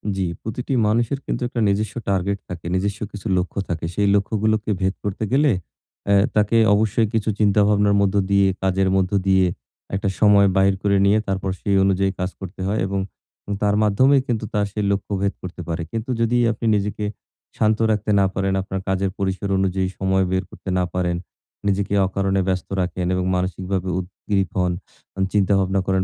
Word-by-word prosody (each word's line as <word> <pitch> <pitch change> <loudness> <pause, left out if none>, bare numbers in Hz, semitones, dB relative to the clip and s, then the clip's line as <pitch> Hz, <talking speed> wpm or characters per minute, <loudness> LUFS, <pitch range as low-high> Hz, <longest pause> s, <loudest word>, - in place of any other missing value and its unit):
জি, 95 - -1 0.2
প্রতিটি 120 +5 -4
মানুষের 115 +5 +1
কিন্তু - - -3
একটা 120 - -4
নিজস্ব 100 +2 0
টার্গেট 100 +1 0
থাকে, 85 -2 -7
নিজস্ব 100 +2 -1
কিছু 105 +1 -7
লক্ষ্য 90 +2 -2
থাকে। 80 -2 -2
সেই 100 -1 +2
লক্ষ্যগুলোকে 110 +1 0
ভেদ 95 0 +1
করতে 100 +1 -3
গেলে 140 +2 +4 0.6
অ্যাঁ 100 -1 +5
তাকে 105 +2 +3 0.2
অবশ্যই 110 +2 +2
কিছু 110 -1 0
চিন্তা-ভাবনার 105 0 +3
মধ্য 100 0 +1 0.2
দিয়ে, 100 0 +4 0.2
কাজের 95 0 +2
মধ্য 95 0 +1 0.2
দিয়ে, 95 -1 +4 0.5
একটা 100 +1 -1
সময় 100 -2 +6
বাহির 95 0 +4
করে 100 -1 +3
নিয়ে 100 +2 +4
তারপর 95 0 -1
সেই 100 - +1
অনুযায়ী 95 0 +2
কাজ 90 0 -1
করতে 95 0 -8
হয় 105 +3 0
এবং 100 0 -2 0.6
তার 105 0 +2
মাধ্যমেই 130 +7 +4
কিন্তু 115 -3 -1
তার 105 -1 +1
সেই 105 +1 -2
লক্ষ্য 100 +1 -2
ভেদ 100 0 0
করতে 90 0 -7
পারে। 85 0 -2
কিন্তু 115 +2 -4
যদি 115 +1 +2
আপনি 115 +1 -5
নিজেকে 105 +1 -2 0.5
শান্ত 110 0 +2
রাখতে 105 0 0
না 100 - +4
পারেন, 95 0 0
আপনার 95 0 -4
কাজের 95 0 0
পরিসর 95 0 -2
অনুযায়ী 95 0 0
সময় 95 0 +2
বের 95 +1 +1
করতে - - -9
না 90 - +2
পারেন, 90 -1 0 0.5
নিজেকে 100 0 0
অকারণে 95 0 0
ব্যস্ত 95 -1 -1
রাখেন 90 0 -2
এবং 90 0 0
মানসিকভাবে 90 +1 -2
উদগ্রীব 95 0 -2
হন, 90 -1 +1 0.4
আ - - -6
চিন্তাভাবনা 95 -1 +2
করেন 95 -1 +2
100 Hz, 175 wpm, -22 LUFS, 95-105 Hz, 0.6 s, সময়